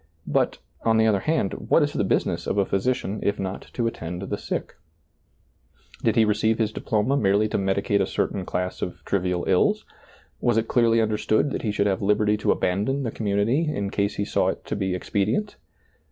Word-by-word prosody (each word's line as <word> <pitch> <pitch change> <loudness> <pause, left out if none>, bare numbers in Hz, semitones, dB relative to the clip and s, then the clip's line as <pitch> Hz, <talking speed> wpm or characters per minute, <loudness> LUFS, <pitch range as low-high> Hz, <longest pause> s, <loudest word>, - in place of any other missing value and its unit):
But, - - +1 0.2
on 110 -1 +2
the 110 - +4
other 105 -3 +3
hand, 155 -7 0 0.2
what - - +5
is - - -1
the - - 0
business - - 0
of - - -1
a 100 - +3
physician 105 0 -1
if 100 +1 0
not 95 0 -5
to 120 - -1
attend 90 -5 -4
the 100 - -2
sick? - - -4 1.3
Did 115 -2 +2
he 115 -2 +5
re 105 - +3
ceive 110 +1 +1
his 110 -2 0
diploma 110 +4 0
merely 105 -4 +3
to - - 0
medicate 100 +1 +1
a 95 - +1
certain 95 - -1
class 90 +1 -3
of 90 - -5
trivial 90 -2 0
ills? - - +2 0.5
was 120 -2 +2
it 115 0 +1
clearly 115 -2 +3
understood 110 +4 +1
that - - -3
he 110 - -1
should 100 0 0
have 100 0 0
liberty 105 +1 +2
to 105 - +1
abandon 105 +10 0
the 115 - -2
community 115 +10 0
in 100 -8 -3
case 100 0 0
he 100 - -1
saw - - +1
it - - -3
to - - -3
be 95 -1 -1
expedient 105 - -1
105 Hz, 200 wpm, -24 LUFS, 100-115 Hz, 1.3 s, what